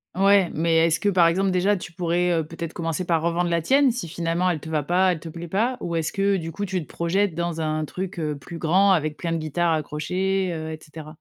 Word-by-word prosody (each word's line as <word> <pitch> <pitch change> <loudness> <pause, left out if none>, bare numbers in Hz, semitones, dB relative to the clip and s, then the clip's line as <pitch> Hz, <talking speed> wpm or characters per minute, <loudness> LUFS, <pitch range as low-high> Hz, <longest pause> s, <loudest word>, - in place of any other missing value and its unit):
Ouais, 195 -1 +4
mais 165 +1 +2
est 165 +1 +4
ce 160 - +1
que 205 - +1
par 175 -3 +5
exemple 190 +3 +1
déjà, 190 +3 +2
tu 175 - -8
pourrais, 175 +1 0
heu, - - -1
peut 165 - -10
être 165 -1 -4
commencer 165 +1 -3
par 165 -2 +1
revendre 170 +1 0
la 170 -1 +1
tienne, 270 - +4
si 225 -8 -5
finalement 170 +2 -1
elle 160 -4 -1
te 160 - -9
va 155 -2 0
pas, 180 +5 +2
elle 165 - -3
te 165 - -8
plaît 170 +1 -7
pas? 230 +8 0
Ou 170 -1 -3
est 165 - +1
ce 160 - -3
que 195 0 +1
du 165 -1 -5
coup 205 +3 -4
tu 185 -2 -2
te - - -10
projettes 180 +2 0
dans 170 -1 -2
un 155 0 -1
truc, 185 +4 -6
heu, 150 -2 -2
plus 155 +4 -9
grand 190 +5 +3
avec 155 -3 0
plein 170 -1 -3
de 165 - 0
guitares 160 +2 0
accrochées, 180 +5 -1
heu, 160 0 -5
et 155 - -7
cetera? 155 0 -11
170 Hz, 275 wpm, -24 LUFS, 160-185 Hz, -, par